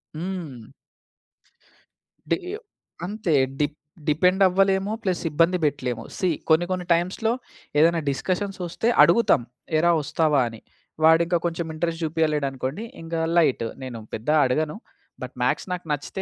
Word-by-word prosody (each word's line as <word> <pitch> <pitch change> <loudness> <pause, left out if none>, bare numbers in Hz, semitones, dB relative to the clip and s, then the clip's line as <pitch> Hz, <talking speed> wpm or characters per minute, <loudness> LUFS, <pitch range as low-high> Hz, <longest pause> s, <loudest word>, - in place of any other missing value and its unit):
హ్మ్. 165 -9 -6 1.6
డీయో 385 +4 -2 0.5
అంతే! 200 -3 -2 0.3
D 150 - +4 0.4
depend 180 +6 +3
అవ్వలేము 195 +2 +2
plus 185 -3 -1
ఇబ్బంది 165 +4 +3
బెట్టలేము. 125 -6 -1
సీ, 185 - +1 0.2
కొన్ని 160 +2 +4
కొన్ని 180 -1 -2
టైమ్స్‌లో 185 +7 0 0.5
ఏదైనా 165 +1 +4
డిస్కషన్స్ 190 +6 -2
ఒస్తే 225 +7 -1
అడుగుతాం, 175 - +4 0.4
"ఏరా 170 +2 +4
ఒస్తావా!" 150 -1 +2
అని. 115 -1 -11 0.5
వాడింకా 170 +2 +5
కొంచెం 170 0 -2
ఇంట్రెస్ట్ 165 +1 -2
జూపియలేడనుకోండి 150 - -1 0.2
ఇంగ 165 0 -5 0.2
లైట్. 135 -8 +3 0.2
నేను 120 -4 -6
పెద్ద 110 +7 -4
అడగను. 150 +5 0 0.5
బట్ - - -7
మ్యాక్స్ - - 0
నాకు 180 -2 -5
నచ్చితే 150 +6 -3
165 Hz, 120 wpm, -24 LUFS, 150-185 Hz, 1.6 s, వాడింకా